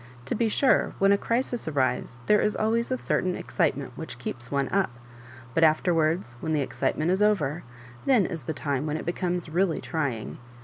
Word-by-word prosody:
To - - -2
be 230 0 +1
sore, 265 +5 +3
when 195 0 +4
a - - +6
crisis 240 -2 -1
arrives 130 -4 -1
there 210 0 +4
is 210 - +1
always 230 +2 +1
a 255 - 0
certain 185 -6 0
excitement 135 -3 -1
wliich 140 -7 -7
keeps 120 0 -6
one 140 -1 0
up; 195 -1 +1 0.6
but 165 - +3
afterwards, 160 -3 +2
when 160 +4 -2
the 150 - +2
excitement 155 +4 0
is 190 +2 +1
over, 175 -7 +2 0.5
then 250 -8 +5
is 160 -7 -5
the - - -2
time 145 -1 -2
when 150 +1 -1
it - - -6
becomes 175 0 -1
really 175 +2 +1
trying. 140 -10 -3
165 Hz, 185 wpm, -27 LUFS, 140-200 Hz, 0.6 s, a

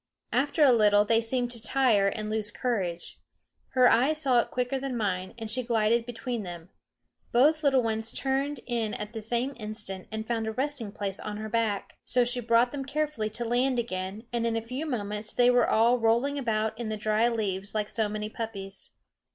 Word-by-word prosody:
After 285 +5 +2
a 275 - +7
little 210 -2 +5
they 225 +1 +3
seemed 245 +1 0
to 235 -2 -5
tire 220 -4 +3
and 215 +2 -2
lose 215 -1 -2
courage. 195 -8 -3 0.5
Her 255 -1 +6
eyes 285 +7 +4
saw 260 -5 +4
it - - 0
quicker 250 +2 -1
than 265 -2 -3
mine, 185 -3 -2
and 225 -1 -5
she 235 +4 -1
glided 230 0 +1
between 240 0 -4
them. 175 -2 -8 0.6
Both 305 +6 +4
little 270 -3 +4
ones 225 0 -2
turned 275 0 -1
in 230 -3 -1
at 210 +1 -6
the 225 - -5
same 240 +5 -1
instant 210 -4 -5
and 220 0 -4
found 225 -2 -1
a 220 - -2
resting 265 -4 -2
place 200 -1 -4
on 210 0 -5
her 215 0 -5
back. 220 -3 -1
So 250 -1 +2
she 245 +1 +2
brought 235 +1 +3
them 285 -2 -4
carefully 285 -5 -2
to 235 +3 -5
land 250 +2 +1
again, 195 -2 -3
and 235 -1 0
in 230 - 0
a 225 0 -2
few 260 +7 -4
moments 210 -4 -3
they 245 0 +5
were 245 -1 +3
all 235 +3 +4
rolling 235 +6 +2
about 220 -3 -1
in 235 -2 -3
the 215 - -2
dry 215 +2 +2
leaves 205 -3 -2
like 210 -1 0
so 220 -1 -1
many 210 0 -3
puppies. 205 -3 -6
230 Hz, 200 wpm, -28 LUFS, 215-250 Hz, 0.6 s, a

